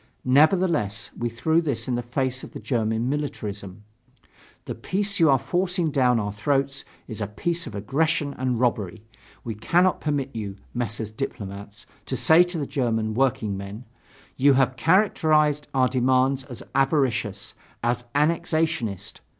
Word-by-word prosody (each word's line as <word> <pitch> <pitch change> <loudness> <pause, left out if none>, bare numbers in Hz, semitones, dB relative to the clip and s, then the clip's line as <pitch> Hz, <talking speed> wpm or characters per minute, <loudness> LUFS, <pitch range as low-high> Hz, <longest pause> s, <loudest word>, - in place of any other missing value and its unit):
Nevertheless, 145 - +3
we 120 - -2
threw 160 +8 +1
this 145 -7 -2
in 130 - -1
the 120 - 0
face 130 +2 -2
of - - -10
the - - -6
German 115 -1 -1
militarism: 105 -9 -4 0.8
The - - -4
peace 200 +1 -1
you 165 -2 +5
are 135 - +6
forcing 175 +2 -1
down 125 -4 +3
our 105 -1 -2
throats 135 +5 0 0.2
is 110 -2 -6
a 105 - -1
peace 170 - -2
of 110 - -8
aggression 145 +7 0
and 125 -2 0
robbery. 110 -4 -1 0.4
We 115 - -4
cannot 175 - +2
permit 140 -4 -2
you, 100 -3 -4 0.2
Messrs. 115 -2 -3
Diplomats, 100 -4 -6 0.2
to - - -2
say 160 +2 +6
to 175 -1 0
the 145 - -2
German 115 -5 -1
workingmen: 105 -3 -1 0.5
"You 140 +1 +5
have 130 -1 +2
characterized 155 -3 +3
our 130 -1 +4
demands 130 +1 +2
as 125 -4 -9
avaricious, 130 -8 0 0.3
as 120 +1 0
annexationist. 155 - 0
130 Hz, 145 wpm, -24 LUFS, 110-150 Hz, 0.8 s, are